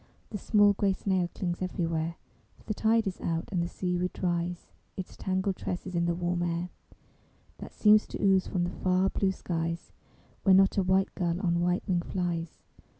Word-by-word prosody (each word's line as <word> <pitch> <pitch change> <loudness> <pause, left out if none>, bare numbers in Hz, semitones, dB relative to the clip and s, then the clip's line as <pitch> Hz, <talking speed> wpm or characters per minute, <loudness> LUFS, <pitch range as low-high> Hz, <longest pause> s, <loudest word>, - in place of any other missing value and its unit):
The 210 - -4
small 205 0 +4
gray 200 -1 +1
snail 185 -2 0
clings 175 -1 -3
everywhere, 165 -2 -2 0.4
For - - -21
the 215 - -3
tide 225 +1 +2
is 190 -2 -4
out; 165 -1 -2
and 180 -3 0
the 170 - -1
sea 180 0 -2
weed 180 +1 -1
dries 175 -1 -2 0.3
Its 190 - -6
tangled 190 0 -1
tresses 180 +1 -4
in 170 0 +1
the 170 0 +1
warm 175 0 -1
air, 175 +1 -1 0.9
That - - -8
seems 210 0 +5
to - - -6
ooze 190 -2 +3
from 180 -3 -1
the 175 - -2
far 185 +1 +1
blue 195 -1 +1
skies, 165 -2 -3 0.5
Where 190 -2 +5
not 195 0 +5
a - - +4
white 190 +1 +2
gull 175 -2 -1
on 170 -3 +1
white 175 +1 0
wing 180 -2 +1
flies. 170 -2 -3
180 Hz, 190 wpm, -29 LUFS, 170-190 Hz, 0.9 s, seems